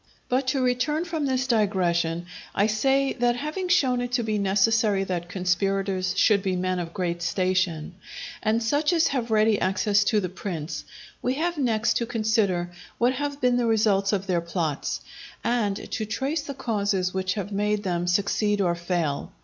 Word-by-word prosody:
But 255 +1 +1
to 260 0 +1
return 275 +6 +1
from 320 -4 -2
this 260 -1 0
digression, 175 -7 +1 0.3
I 200 - +3
say, 270 +6 +2
that 240 -1 +1
having 305 +8 -3
shown 265 -9 +3
it 245 0 -3
to 245 -1 +1
be 215 -1 -1
necessary 200 +1 +2
that 175 -2 -3
conspirators 185 0 0
should 205 -1 +4
be 190 -2 -1
men 185 0 -1
of 170 -1 -4
great 170 -1 -2
station, 180 -2 0 0.5
and 225 +2 +1
such 290 +8 +1
as 330 -1 +3
have 250 -4 -2
ready 215 -1 +3
access 200 +2 +2
to 215 -1 +3
the 185 - -2
prince, 175 -3 -5 0.4
we 250 +1 0
have 335 +2 -1
next 230 -4 +1
to 235 - -2
consider 215 -6 0 0.3
what 245 +2 +3
have 285 +1 -3
been 250 -1 +3
the 240 -1 +1
results 210 -3 +2
of 195 -2 -1
their 180 -3 0
plots, 165 -4 -2 0.4
and 220 -4 -1
to 220 - -2
trace 275 +8 -1
the 280 -1 -7
causes 200 -7 -1
which 190 0 -1
have 200 -1 -4
made 210 +1 0
them 175 -2 -1
succeed 205 +3 +1
or 180 -3 +2
fail. 170 -4 -2
210 Hz, 175 wpm, -25 LUFS, 185-245 Hz, 0.5 s, should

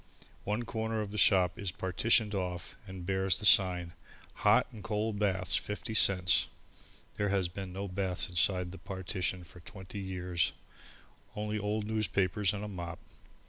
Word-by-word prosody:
One 105 +4 -1
corner 110 -1 -2
of 105 -1 -5
the 105 - -3
shop 90 -3 +4
is 100 -3 -2
partitioned 105 +4 +1
off 90 -3 -4
and 95 -2 -8
bears 95 0 +1
the 105 - -5
sign: 90 -4 +4 0.4
HOT - - +4
AND 110 - -11
COLD 105 -1 -2
BATHS, 95 -3 +3
50 105 +2 -4
CENTS. 90 -4 +4 0.7
There 105 - 0
has 95 -2 +1
been 95 +1 -7
no 100 +2 -4
bath 95 -1 +1
inside 90 +1 +1
the 95 - -10
partition 95 0 -3
for 90 +1 -14
twenty 95 +3 -9
years 90 -3 -1 0.8
only 105 0 -2
old 105 +1 -2
newspapers 105 -2 +1
and 105 0 -5
a - - -4
mop. 85 -4 -6
95 Hz, 155 wpm, -31 LUFS, 90-105 Hz, 0.8 s, shop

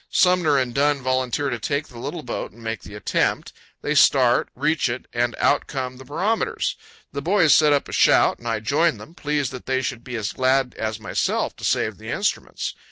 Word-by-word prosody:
Sumner 180 -5 +3
and 130 -2 0
Dunn 140 0 +1
volunteer 130 +2 0
to 120 - -3
take 145 +6 -2
the 120 - -12
little 150 +6 -5
boat 120 - -5
and 115 +1 -16
make 110 -4 -4
the 100 - -11
attempt. 105 - -1 0.3
They - - 0
start, - - +4
reach 150 0 +1
it, 120 +1 -4
and 120 0 0
out 145 - +2
come 130 -2 -4
the 130 - -12
barometers! 225 - -1 0.4
The 140 - -4
boys 175 -2 +4
set 150 -1 +5
up 145 -1 +2
a - - -9
shout, - - +4
and 120 - -9
I 115 -2 -1
join 150 +8 +2
them, 165 - -12
pleased 150 -5 -2
that 125 -2 -9
they 130 0 0
should 125 -3 -4
be 125 - -6
as 110 -3 -3
glad 130 -1 +1
as 110 0 -4
myself 100 -5 -1
to - - -13
save - - 0
the - - -9
instruments. - - -2
130 Hz, 210 wpm, -23 LUFS, 120-150 Hz, 0.4 s, set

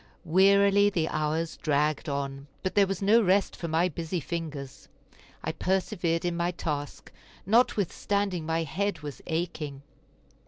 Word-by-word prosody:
Wearily 200 +3 +5
the 170 -5 0
hours 155 +2 -1
dragged 150 +1 0
on, 140 0 -4 0.2
but 185 - -1
there 200 -1 +4
was 195 0 -3
no 220 +4 +5
rest 195 0 +2
for 170 - -5
my 165 +2 +2
busy 170 +1 -3
fingers. 150 -4 -6 0.6
I - - -1
persevered 180 -3 -1
in 175 -1 0
my 170 0 0
task, 150 -4 -4 0.3
notwithstanding 200 -4 +1
my 165 +1 0
head 200 +4 -2
was 145 -2 -7
aching. 160 -4 -3
170 Hz, 135 wpm, -28 LUFS, 155-195 Hz, 0.6 s, Wearily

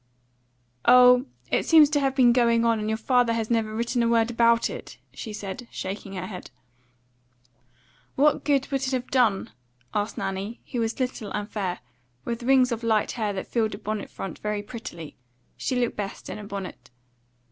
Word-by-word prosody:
"Oh, 250 0 +7 0.2
it - - +2
seems 315 -3 +7
to 295 - +3
have 270 -1 0
been 245 -3 +5
going 235 -1 +3
on, 230 -1 +2
and 215 0 -2
your 220 - 0
father 245 +1 +2
has 225 0 -2
never 225 -2 +1
written 235 +2 0
a 235 - +2
word 230 0 +2
about 235 0 +3
it," - - -8 0.2
she 220 - -7
said, 210 +3 -6
shaking 195 +1 -6
her 185 -1 -4
head. 185 -2 -8 1.7
"What 295 +2 +3
good 280 -2 +1
would 270 -1 0
it 265 0 -2
have 250 -1 -3
done?" 230 -7 +2 0.4
asked 210 +1 -2
Nanny, 195 +4 -4
who 245 - -2
was 225 +2 -2
little 250 -5 -3
and 205 0 -3
fair, 190 -5 -3 0.4
with 235 0 -3
rings 255 0 +4
of 235 -1 -2
light 220 -2 +1
hair 215 -3 -2
that 190 - -4
filled 220 -3 -1
a - - -9
bonnet 215 0 -4
front 195 - -7
very 210 -1 -3
prettily; 175 -8 -9 0.4
she 260 - -2
looked 245 -1 0
best 200 -2 -5
in - - -6
a - - -8
bonnet. 200 -2 -7
230 Hz, 185 wpm, -25 LUFS, 210-250 Hz, 1.7 s, Oh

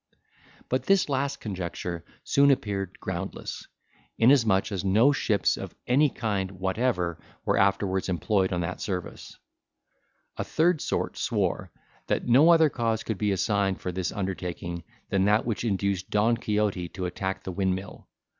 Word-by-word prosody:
But 130 - -1
this 195 -5 +4
last 140 +1 -1
conjecture 90 -3 -5 0.2
soon 140 0 +4
appeared 100 -8 -1
groundless, 95 +1 -5 0.5
inasmuch 115 -5 +4
as 95 -2 -2
no 110 +8 +4
ships 105 -8 +1
of - - -7
any 140 +4 +4
kind 100 -6 -2
whatever 95 -2 -1 0.2
were - - +2
afterwards 100 -1 +1
employed 95 +1 +1
on 90 -1 0
that 85 +2 -4
service. 90 -3 -5 1.0
A - - -1
third 165 0 +2
sort - - -2
swore, - - -1 0.4
that - - -1
no 135 +7 +6
other 165 -2 +7
cause 115 -3 -1
could 110 -4 -3
be 105 -1 +1
assigned 100 0 +1
for 90 - -3
this 90 0 -2
undertaking 90 -3 -4 0.3
than 95 -1 +2
that 105 +2 +3
which 115 -2 -2
induced 100 -3 -1
Don 110 +3 +3
Quixote 105 -6 -1
to 95 +1 -5
attack 95 +1 -3
the 95 - -4
windmill. 95 +1 -3
100 Hz, 145 wpm, -27 LUFS, 95-115 Hz, 1.0 s, other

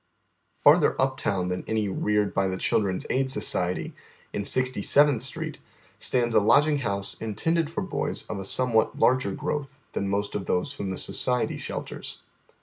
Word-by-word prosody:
Farther - - +4
uptown 100 -9 0
than 90 0 -3
any 110 -2 0
reared 105 +1 0
by 95 -1 +1
the 95 0 -2
Children's 95 -1 0
Aid 130 0 +1
Society, 90 -9 0 0.4
in 100 - -2
Sixty 130 -2 +2
seventh 145 0 +4
Street, - - -3 0.4
stands 120 -2 +1
a - - +6
lodging 145 +8 +4
house 100 -5 -2
intended 160 +9 0
for 190 +5 -3
boys 190 - -2
of 105 - -5
a - - -5
somewhat 115 +2 +1
larger 130 -5 +3
growth 140 +5 -4
than 100 - -2
most 100 +1 -1
of 100 - -4
those 90 +11 0
whom 100 -9 -5
the 95 - -4
Society 125 -1 0
shelters. - - -6
110 Hz, 160 wpm, -26 LUFS, 100-135 Hz, 0.4 s, a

